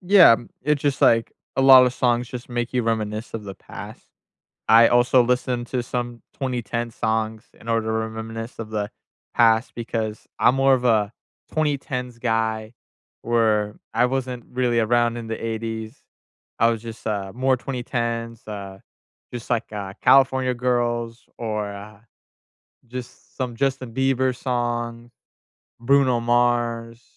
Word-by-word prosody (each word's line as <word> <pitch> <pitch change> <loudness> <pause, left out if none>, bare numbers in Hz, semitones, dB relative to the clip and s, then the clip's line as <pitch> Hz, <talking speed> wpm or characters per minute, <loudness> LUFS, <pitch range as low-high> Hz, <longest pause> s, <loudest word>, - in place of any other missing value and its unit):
Yeah, 180 - +7 0.3
it 150 +3 +2
just 140 -1 -1
like, 115 -1 +4 0.2
a - - +2
lotta 130 -1 +8
songs 120 -1 0
just 125 -1 -8
make 120 -1 -3
you 125 -1 +1
reminisce 110 -1 -2
of 110 - -5
the 100 -1 -7
past. - - -11 0.6
I 115 +1 +8
also 120 +1 +4
listened 125 0 -1
to 125 -1 -2
some 120 -1 -4
2010 120 -3 -3
songs 110 0 -1 0.2
in 115 - -15
order 115 -1 0
to - - 0
re 110 0 -1
reminisce 115 +1 -7
of 110 - -6
the 105 -1 -2 0.5
past 115 0 +4
because 110 -2 -4
I'm 125 - +5
more 135 0 +4
of 125 -1 +1
a 110 -3 +3 0.4
2010s 130 -5 -2
guy 110 -2 -1 0.5
where 110 -3 +1 0.2
I 125 - +4
wasn't 125 -2 -3
really 125 -2 +1
around 120 +1 +2
in 115 - -6
the 110 0 -5
'80s. 110 +1 -4 0.6
I 115 - +5
was 115 -2 -2
just, 115 0 -9
uh, 100 -3 -2
more 130 +1 +2
2010s, 115 -3 -4
uh, 100 -2 -7 0.5
just 120 -1 -7
like, 120 -3 -1
uh, 100 -2 -5
California 130 -1 +4
Girls 120 -1 -1
or, 105 -3 -2
uh, 100 +1 -11 0.9
just 125 +1 -10
some 125 -3 -3
Justin 130 -2 -1
Bieber 130 -1 +1
song, 120 -2 -3 0.7
Bruno 130 -1 +3
Mars, 120 -1 0
120 Hz, 145 wpm, -23 LUFS, 110-125 Hz, 0.9 s, lotta